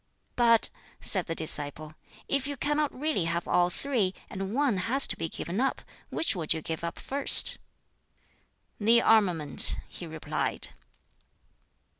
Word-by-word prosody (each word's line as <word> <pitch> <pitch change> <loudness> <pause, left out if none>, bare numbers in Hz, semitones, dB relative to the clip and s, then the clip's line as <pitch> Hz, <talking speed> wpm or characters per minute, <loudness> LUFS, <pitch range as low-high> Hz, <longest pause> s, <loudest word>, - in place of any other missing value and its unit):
"But," 230 -2 +4 0.3
said 190 -3 +2
the 165 - -4
disciple, 155 -1 0 0.3
"if 275 -1 -1
you 285 -1 -5
cannot 295 +2 -1
really 295 - -1
have 170 0 -3
all 180 0 +2
three, 210 -3 -2 0.2
and 195 0 -5
one 275 -7 +1
has 270 +3 +4
to - - +1
be 165 0 -5
given 185 +9 -4
up, 270 - -2 0.3
which 320 - -1
would 165 -2 -1
you 160 - -5
give 160 0 -5
up 170 - -5
first?" 280 +1 +4 1.2
"The 230 +3 +4
armament," 180 -10 +3
he 175 - -10
replied. 160 -1 -2
195 Hz, 140 wpm, -27 LUFS, 165-265 Hz, 1.2 s, But